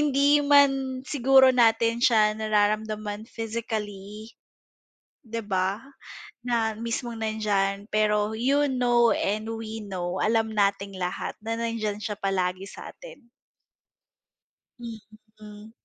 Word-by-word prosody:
hindi 285 +1 +3
man 270 -2 +3
siguro 265 -1 +5
natin 230 -2 +3
siya 215 -3 +3
nararamdaman 215 0 -1
physically, 215 -2 -6 0.9
di 230 -4 -6
ba? 190 0 0 0.7
Na 225 -3 0
mismong 230 +1 -4
nandiyan, 205 -2 -1
pero 210 0 +1
you 280 +4 +2
know 240 -2 +3
and 215 +2 -2
we 225 0 -6
know, 185 -3 -4
alam 220 0 +1
nating 200 -1 0
lahat 180 - -3
na 225 +1 -3
nandiyan 230 -3 -2
siya 210 0 -4
palagi 190 0 -1
sa - - -10
atin. - - -14 1.5
Mm. 215 -2 -12
220 Hz, 105 wpm, -26 LUFS, 210-235 Hz, 1.5 s, siguro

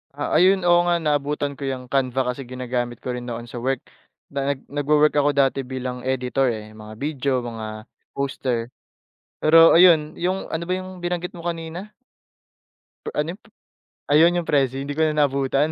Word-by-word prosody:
Ah, 145 - -3
ayun, 190 +1 +4
oo 175 0 +5
nga, 175 - +3
naabutan 145 -1 0
ko 140 - -3
yung 125 -2 -5
Canva 130 -1 +1
kasi 130 0 -8
ginagamit 125 -1 -4
ko 125 - -3
rin 125 0 -5
noon 120 0 -5
sa 120 0 -7
work. 130 +1 -1 0.5
Na 140 0 -1
nag - - -18
nagwo-work 150 +1 +3
ako 145 0 +3
dati 135 -1 +2
bilang 130 -1 -4
editor 130 0 0
eh, 110 -1 -7
mga 110 0 -10
video, 140 -2 -1
mga 110 -2 -6 0.3
poster. 125 -3 -2 0.7
Pero 165 +1 +7
ayun, 165 -3 +6
yung 185 +2 -1
ano 160 +1 -3
ba 180 - -2
yung 185 0 -8
binanggit 175 0 -3
mo 170 - -9
kanina? 170 +5 -5 1.2
Ano 150 +2 0
yun, 210 - -25
p - - -34 0.7
ayun, 165 +4 +6
yung - - -18
Prezi. 135 -2 +1
Hindi 145 +1 -4
ko - - +1
na 155 - 0
naabutan. 140 +1 +1
140 Hz, 175 wpm, -23 LUFS, 125-160 Hz, 1.2 s, Pero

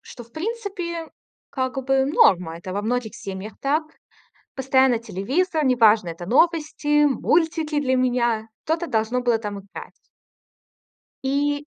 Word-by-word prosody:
Что, 240 - -11
в 235 - -26
принципе, 355 -4 -4 0.4
как 260 0 -2
бы 270 0 +2
норма. 180 - +3
Это 185 +1 -7
во 200 - -2
многих 230 -1 -2
семьях 195 +2 -7
так. 300 +3 +1 0.7
Постоянно 265 -2 +3
телевизор, 270 - -1
неважно, 220 -7 +4
это 170 +1 -7
новости, 295 - +2
мультики 315 +1 +1
для 260 -2 +1
меня. 240 -3 +1 0.2
Что-то 325 +2 0
должно 225 +3 0
было 240 -2 +2
там 205 -2 -5
играть. 200 - -11 1.3
И 285 +2 0
260 Hz, 125 wpm, -23 LUFS, 220-300 Hz, 1.3 s, неважно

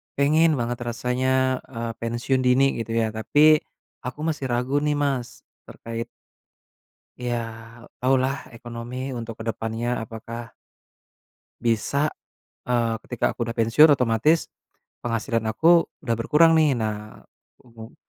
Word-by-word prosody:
pengen 155 +3 +4
banget 120 +1 -2
rasanya, 130 +2 0
eee, 115 -2 -5
pensiun 120 +3 -1
dini 135 +2 +3
gitu 115 0 -4
ya 115 -1 +2
tapi, 145 +8 +5 0.5
aku 125 +3 -5
masih 150 -4 -2
ragu 125 +4 +1
nih 150 0 0
Mas, 135 -4 -2 0.2
terkait 115 0 -6 1.1
ya 125 -1 -2 0.6
taulah 130 +1 +1
ekonomi 120 +3 -6
untuk 115 -1 -7
ke - - -5
depannya 115 +2 -3 0.2
apakah 115 +1 -8 1.1
bisa, 120 +6 +1 0.6
eee, 120 -2 +1
ketika 125 - 0
aku 120 - -4
udah 115 - -4
pensiun 125 +7 +6
otomatis, 125 +6 +2 0.5
penghasilan 115 0 -1
aku 165 +10 +4 0.2
udah 120 -5 0
berkurang 160 +7 +5
nih 150 -3 +4
nah, 105 -1 -4 0.4
kemu 115 -1 -13
120 Hz, 120 wpm, -24 LUFS, 115-135 Hz, 1.1 s, pensiun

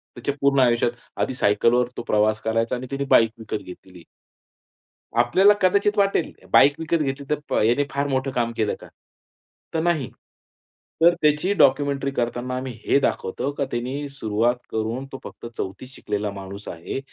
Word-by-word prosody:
त्याच्या 125 +3 -2
पूर्ण 140 0 +3
आयुष्यात 120 -2 +3 0.3
आधी - - 0
सायकलवर 120 +1 +2
तो - - -2
प्रवास 110 0 +2
करायचा 115 +2 0
आणि 125 +1 -6
त्यानी 140 0 -2
बाईक 115 -1 +5
विकत 110 -1 -5
घेतलेली. 90 -1 -13 1.2
आपल्याला 185 +13 +5
कदाचित 200 +3 +3
वाटेल, 195 -4 +2 0.2
"बाईक 145 +1 +7
विकत 165 +1 0
घेतली 140 0 -3
तर 150 - 0
प - - -3
याने 120 +6 +3
फार 140 +1 -1
मोठं 135 0 -1
काम 120 -2 -1
केलं 110 -2 0
का?" - - -11 0.9
तर 160 - 0
नाही. 160 -7 0 0.9
तर 170 +1 +7
त्याची 150 +6 +2
डॉक्युमेंटरी 140 0 +3
करताना 120 0 -2
आम्ही 130 0 -4
हे - - +4
दाखवतो, 135 +1 -1
का 140 -1 -2
त्यांनी 130 +5 -3
सुरुवात 120 -2 0 0.2
करून 115 +4 -2
तो 135 - -7
फक्त - - -10
4थी 95 +7 -5
शिकलेला 105 -5 -4
माणूस 100 +1 -9
आहे. 85 +9 -5
130 Hz, 160 wpm, -23 LUFS, 115-140 Hz, 1.2 s, बाईक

